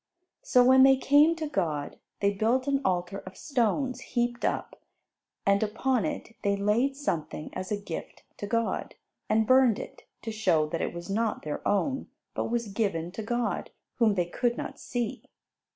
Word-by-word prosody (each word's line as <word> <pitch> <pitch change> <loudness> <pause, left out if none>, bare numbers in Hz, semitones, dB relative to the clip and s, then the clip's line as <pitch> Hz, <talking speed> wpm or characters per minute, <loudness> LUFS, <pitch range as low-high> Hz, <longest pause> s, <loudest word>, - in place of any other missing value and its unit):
So 250 - +4
when 260 +1 +7
they 270 0 +7
came 290 +5 +5
to 320 -1 -3
God, 160 - -2 0.2
they 200 0 +3
built 235 +6 +1
an 280 -1 +1
altar 180 0 -1
of 185 0 -11
stones 255 0 0
heaped 240 -1 -2
up, - - -2 0.6
and 200 0 +3
upon 225 +3 0
it, 225 - -5
they 200 0 +1
laid 215 +7 +1
something 165 - -3
as 185 +1 -5
a 210 - +1
gift 200 -5 -7
to 205 - -5
God, 230 +1 -1 0.3
and 220 0 +3
burned 255 -2 +5
it, - - -9 0.2
to 225 - -3
show 185 -8 +2
that 165 - -2
it - - -1
was 170 0 -8
not 220 +2 -1
their 150 - -4
own, 265 +7 0 0.3
but - - -2
was 235 -2 -1
given 195 -5 -1
to 210 - -6
God, 240 +2 -2 0.3
whom 225 -4 +3
they 175 -2 +1
could 240 +7 -1
not - - -6
see. 240 -3 -3
220 Hz, 175 wpm, -28 LUFS, 195-255 Hz, 0.6 s, when